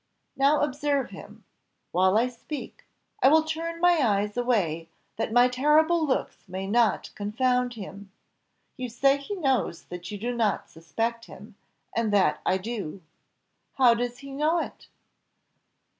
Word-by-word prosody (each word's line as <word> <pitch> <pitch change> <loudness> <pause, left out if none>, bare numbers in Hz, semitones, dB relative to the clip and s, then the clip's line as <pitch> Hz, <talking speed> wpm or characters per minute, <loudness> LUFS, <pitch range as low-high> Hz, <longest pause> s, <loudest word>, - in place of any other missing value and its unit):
Now 280 +2 +3
observe 285 -1 0
him, - - -12 0.5
while 185 +3 +3
I 235 +3 +3
speak; 255 +4 -8 0.4
I - - +6
will 315 +3 +6
turn 330 +1 -4
my 350 -1 +4
eyes 210 -3 +1
away, 190 -10 0 0.3
that 225 - -2
my 245 +2 +6
terrible 305 +6 +3
looks 260 - -1
may 190 +1 -4
not 230 +3 +1
confound 250 +4 0
him. 200 -1 -9 0.7
You 255 -1 -4
say 275 +4 +3
he 280 +9 -6
knows 265 - 0
that 180 0 -8
you 210 - -5
do 240 +4 -3
not 220 -4 0
suspect 230 +8 -3
him, 205 +4 -13 0.4
and 225 -2 +1
that 200 -2 +2
I 190 - +3
do. 195 -4 -6 0.7
How 250 -3 +5
does 245 +1 -3
he 275 +1 -10
know 305 +5 +1
it?" 335 - -5
245 Hz, 145 wpm, -26 LUFS, 205-280 Hz, 0.7 s, I